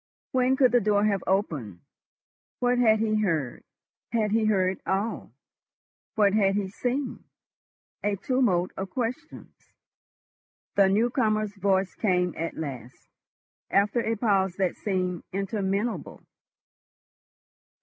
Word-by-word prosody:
When 255 0 +2
could 255 -2 +5
the 245 - +4
door 205 0 +2
have 200 -3 +1
opened? 145 - -1 0.8
What 245 0 +1
had 220 -3 +5
he 215 -1 +1
heard? 160 - -1 0.5
Had 220 -3 +1
he 220 0 +2
heard 190 -3 +1
all? 200 +4 -2 0.8
What 205 -2 +4
had 195 -2 +3
he 200 -2 -1
seen? 250 +6 -3 0.8
A 205 -1 +1
tumult 195 -5 +1
of 190 0 -5
questions. 255 - -6 1.0
The 200 -2 +4
new 225 +5 +2
comer's 215 -4 0
voice 195 -1 +1
came 180 -4 +1
at 165 +1 -4
last, 130 -6 -7 0.6
after 205 +4 +2
a 225 -1 -1
pause 195 -4 +1
that 185 -2 0
seemed 185 -4 -2
interminable. 195 0 -2
200 Hz, 120 wpm, -26 LUFS, 190-225 Hz, 1.0 s, could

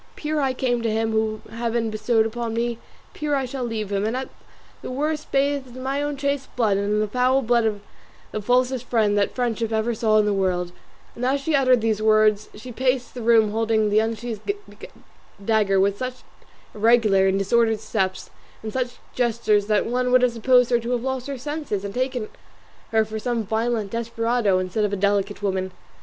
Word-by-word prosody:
Pure 300 0 -2
I 265 -2 +1
came 245 -2 0
to 230 - 0
him 225 +1 0
whom 220 0 -1
Heaven 230 0 -1
bestowed 220 +1 +1
upon 230 0 -3
me, 235 0 -1 0.3
pure 295 -1 -1
I 270 -1 0
shall 255 0 -5
leave 220 -4 -3
him; 200 0 0
and 225 +4 -1
at 265 - -4 0.5
the - - -6
worst 300 +4 -2
bathed 275 -2 0
in 255 - -7
my 275 +2 -1
own 290 -1 -2
chaste 280 0 -2
blood 215 -5 +2
and 200 0 -1
in 210 - +2
the 215 - 0
foul 255 +4 +2
blood 235 0 +2
of 210 -2 -1 0.5
the 215 - -3
falsest 250 +2 +1
friend 215 -3 +2
that 205 -1 0
friendship 235 -2 -1
ever 220 +2 0
saw 220 -1 +2
in 210 - +4
the 210 - +1
world;" 180 -2 0 0.4
and 240 - -7
as 265 +3 +2
she 305 +3 -2
uttered 255 -4 +4
these 220 -1 0
words 215 -1 +3
she 220 +4 -9
paced 255 +1 -1
the 245 - -6
room 225 -2 +4
holding 220 -1 +1
the 210 - +4
unsheathed 225 - -2 0.9
dagger, 210 -3 +3
with 200 +1 +1
such 255 0 -5 0.5
irregular 215 -3 +4
and 190 0 +2
disordered 225 +2 +2
steps, 190 -3 -2 0.3
and 215 - -5
such 255 -1 -2 0.2
gestures 225 -4 +1
that 210 -1 +2
one 250 +1 0
would 250 0 +5
have 250 - +4
supposed 250 +1 +3
her 240 - +4
to 235 +1 -5
have 245 -1 -1
lost 265 -1 -3
her 280 -1 -4
senses, 280 -7 -4
and 200 - -5
taken 255 -2 -2 0.6
her 220 -1 +2
for 220 0 -5
some 235 0 -1
violent 220 -1 -1
desperado 230 -3 0
instead 185 +3 -1
of 205 - 0
a - - +2
delicate 200 +1 0
woman. 190 -1 -1
230 Hz, 200 wpm, -23 LUFS, 215-250 Hz, 0.9 s, would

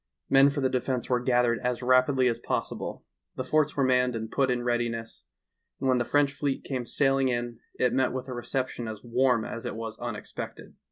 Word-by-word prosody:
Men 135 +1 +7
for 140 0 -3
the 130 - +3
defense 125 -1 -2
were 125 - +3
gathered 120 -2 +2
as 125 0 -2
rapidly 130 +1 +4
as 115 -1 0
posvsible, - - -3 0.3
the 130 - -3
forts 155 +2 +1
were 140 - +3
manned 125 -1 +3
and 110 0 -5
pu^t 135 -2 +2
in 125 -1 0
readiness, 120 - -2 0.5
and 135 - -1
when 130 -1 +3
the 120 - 0
French 145 +1 +2
fleet 145 -1 -2
came 125 -3 -4
sailing 135 -1 +2
in, 120 -2 -2 0.2
it 125 -1 +1
met 130 0 +2
with 130 +1 -4
a 130 - -5
reception 120 0 -3
as 110 -1 -7
warm 125 -1 +2
as 115 - -6
it - - -4
was 115 0 -6
unexpected. 120 -3 -6
125 Hz, 205 wpm, -28 LUFS, 120-130 Hz, 0.5 s, Men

